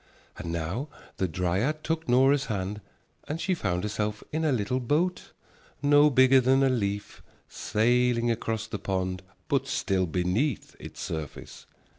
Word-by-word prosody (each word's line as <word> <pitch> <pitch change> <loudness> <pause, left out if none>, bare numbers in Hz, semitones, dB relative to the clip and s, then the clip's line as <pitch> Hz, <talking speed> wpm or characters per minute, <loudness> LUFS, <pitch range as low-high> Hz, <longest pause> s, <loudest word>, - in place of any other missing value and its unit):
And 85 - -4
now 85 - -3 0.3
the 95 - 0
dryad 95 - -1
took 165 0 -2
Nora's 135 +3 +4
hand 105 -1 -3 0.5
and 155 +2 -3
she 190 - 0
found 95 - -1
herself 105 0 -2
in 160 +1 -1
a 155 - +2
little 125 +1 0
boat, 155 +9 -1 0.5
no 145 +1 +6
bigger 130 0 +6
than 135 +2 +3
a 135 - +4
leaf, 105 -5 -2 0.3
sailing 120 +1 +1
across 110 -1 -2
the 105 -2 -5
pond 95 -1 -2 0.3
but - - 0
still 95 -2 0
beneath 95 - -1
its - - -9
surface. 80 -3 -6
115 Hz, 145 wpm, -27 LUFS, 95-135 Hz, 0.5 s, no